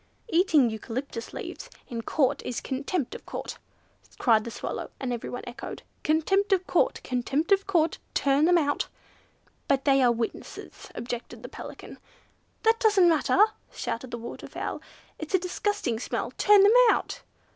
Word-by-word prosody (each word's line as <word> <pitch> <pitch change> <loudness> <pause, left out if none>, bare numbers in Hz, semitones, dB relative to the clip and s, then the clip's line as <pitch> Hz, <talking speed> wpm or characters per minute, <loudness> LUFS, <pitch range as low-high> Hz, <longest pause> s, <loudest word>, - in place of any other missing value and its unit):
"Eating 320 - +4
eucalyptus 230 +2 -5
leaves - - -7 0.2
in 230 -1 -4
Court 265 +3 +1
is 245 - -3
contempt 275 +2 -3
of - - -9
Court," - - -6 0.6
cried 220 -3 +3
the - - -4
Swallow - - -5
and 255 -2 -2
everyone 240 +1 -5
echoed, 245 +1 -8 0.2
"Contempt 385 +7 +2
of 375 -1 +3
Court! - - +2
Contempt 265 +8 -1
of 395 0 +4
Court! 335 -4 +2 0.2
Turn 280 +2 +3
them 350 +1 +5
out!" 290 -3 0 0.8
"But 275 -1 +1
they 275 -1 +5
are 245 -2 +5
witnesses," 230 -1 -5
objected 240 0 -6
the - - -7
Pelican. - - -10 0.6
"That 450 +1 +4
doesn't 410 -6 +5
matter!" 320 +2 +2 0.3
shouted 240 +2 -4
the 240 - -5
Waterfowl, 235 0 -6 0.4
"It's 315 +4 -1
a - - +7
disgusting 365 - -2
smell! - - -3
Turn 410 -1 +6
them 410 +2 +6 0.2
out!" - - 0
285 Hz, 150 wpm, -27 LUFS, 245-370 Hz, 0.8 s, a